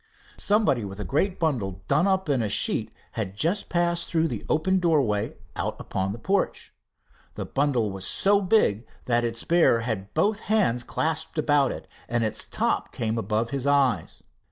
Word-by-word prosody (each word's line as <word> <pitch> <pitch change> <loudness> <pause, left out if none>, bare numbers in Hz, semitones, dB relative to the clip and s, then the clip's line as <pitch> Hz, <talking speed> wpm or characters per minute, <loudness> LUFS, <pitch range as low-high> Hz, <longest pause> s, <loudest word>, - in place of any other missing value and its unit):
Somebody 200 - +2
with 100 0 -7
a - - -3
great 180 +8 0
bundle 100 - -1
done 150 +7 +3
up 190 -1 +1
in 135 -4 +1
a 110 - -1
sheet - - +2 0.2
had 100 -4 -4
just 180 - 0
passed 170 -1 0
through 165 -1 +1
the - - -5
open 185 +5 +2
doorway 140 - +1 0.2
out - - -3
upon 95 +1 -2
the 105 - -5
porch. 195 - -1 0.6
The - - -4
bundle 130 -7 0
was 95 -1 -5
so 200 +1 +3
big 180 - +2 0.2
that 120 -1 +2
its 115 -1 -2
bearer 165 -9 +4
had 105 -4 -4
both 210 0 +2
hands 190 - +1
clasped 160 +4 -2
about 145 -3 +3
it, - - -8 0.2
and 120 0 +1
its 110 - -1
top - - -1
came 115 0 -2
above 115 +1 -1
his 140 -1 -2
eyes. 135 - +1
140 Hz, 175 wpm, -25 LUFS, 110-170 Hz, 0.6 s, bearer